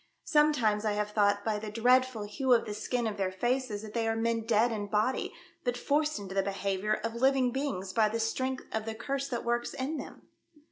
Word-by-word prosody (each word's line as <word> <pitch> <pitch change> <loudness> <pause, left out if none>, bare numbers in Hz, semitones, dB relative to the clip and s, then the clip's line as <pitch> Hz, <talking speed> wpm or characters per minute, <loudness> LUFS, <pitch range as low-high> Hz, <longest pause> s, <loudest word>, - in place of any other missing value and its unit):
Sometimes 285 - +3
I 215 -1 +1
have 210 0 -1
thought 205 -1 +2
by 215 -2 0
the 215 0 -6
dreadful 245 +1 +3
hue 250 +5 +1
of 235 - +3
the 210 - -4
skin 240 +3 -2
of 215 -2 -2
their 190 -2 0
faces 240 +1 -1
that 215 -1 -9
they 230 -1 0
are 225 - +1
men 230 0 0
dead 230 +1 +3
in 205 -2 -3
body, 215 +5 0 0.3
but 245 -1 -1
forced 300 +3 +1
into 195 -2 -7
the 195 - +2
behaviour 195 +1 -1
of 230 0 -2
living 260 +1 +3
beings 195 -9 -3
by 215 0 +4
the 230 +2 -2
strength 260 +4 -1
of 220 0 -2
the 225 0 -4
Curse 275 +4 -2
that 245 -4 -4
works 240 0 -1
in 280 +4 -2
them." - - -9
225 Hz, 220 wpm, -30 LUFS, 210-255 Hz, 0.3 s, by